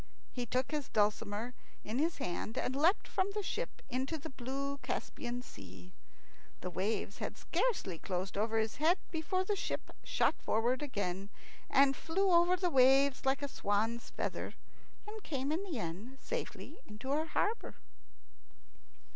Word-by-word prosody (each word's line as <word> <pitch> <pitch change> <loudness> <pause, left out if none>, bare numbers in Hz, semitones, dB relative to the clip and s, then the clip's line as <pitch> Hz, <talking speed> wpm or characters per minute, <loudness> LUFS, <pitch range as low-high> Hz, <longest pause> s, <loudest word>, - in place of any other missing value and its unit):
He 245 -2 -3
took 255 +5 0
his 295 -3 -2
dulcimer 210 +2 +1 0.3
in 220 +5 -2
his 325 +3 +1
hand, 180 +5 -3
and 255 - 0
leapt 330 +8 +4
from 380 +1 +1
the 420 - 0
ship - - -3
into 265 +6 -1
the 310 +1 -7
blue 275 +3 -3
Caspian 245 -2 -3
Sea. 95 - -12 0.7
The 180 - -3
waves 200 +2 -1
had - - -3
scarcely 280 - 0
closed 185 0 -2
over 220 +2 +1
his 220 0 0
head 325 +6 +4
before 360 +3 0
the 410 +2 0
ship - - -3
shot - - +3
forward 240 +4 +2
again, 200 -8 -2 0.4
and 275 0 +6
flew 380 +7 +1
over 345 +1 +6
the 360 -1 +1
waves 270 0 +5
like 275 +2 +2
a - - 0
swan's 225 -1 0
feather, - - -3 0.5
and 430 +1 -6
came 280 -5 -2
in 335 +5 0
the 335 -9 -3
end 210 +8 -4
safely - - -5 0.2
to 265 +4 -3
her 305 +3 +2
harbour. 425 +7 0
265 Hz, 155 wpm, -35 LUFS, 220-320 Hz, 0.7 s, and